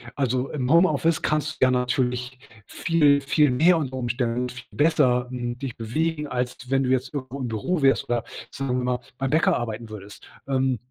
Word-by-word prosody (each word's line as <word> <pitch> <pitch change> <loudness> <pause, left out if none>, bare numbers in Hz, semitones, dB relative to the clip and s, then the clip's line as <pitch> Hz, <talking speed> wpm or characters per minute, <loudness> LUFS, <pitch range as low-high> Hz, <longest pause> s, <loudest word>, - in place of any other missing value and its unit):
also 130 -1 -1
im 130 -4 -2
Homeoffice 165 -1 +3
kannst 155 0 0
du 130 - +2
ja 130 - +3
natürlich 125 0 -1 0.3
viel, 150 -4 +3
viel 150 +2 +3
mehr 160 +8 +4
unter 130 -4 -4
Umständen 120 0 -1
viel 125 -1 -10
besser, 140 -5 +2
hm, 120 -1 -4
dich 130 -2 -6
bewegen, 150 +7 -2
als 125 -1 -4
wenn 135 0 +2
du 130 - -1
jetzt 130 +2 -1
irgendwo 130 0 -5
im 130 - -3
Büro 130 - -2
wärst 135 0 +4
oder 120 -2 0 0.3
sagen 135 -2 -2
wir 125 - -1
mal 125 0 0 0.2
beim 135 0 -2
Bäcker 160 +1 +3
arbeiten 115 -1 -5
würdest. 105 -1 -11 0.2
Ähm, 130 -2 +1
130 Hz, 185 wpm, -24 LUFS, 125-145 Hz, 0.3 s, mehr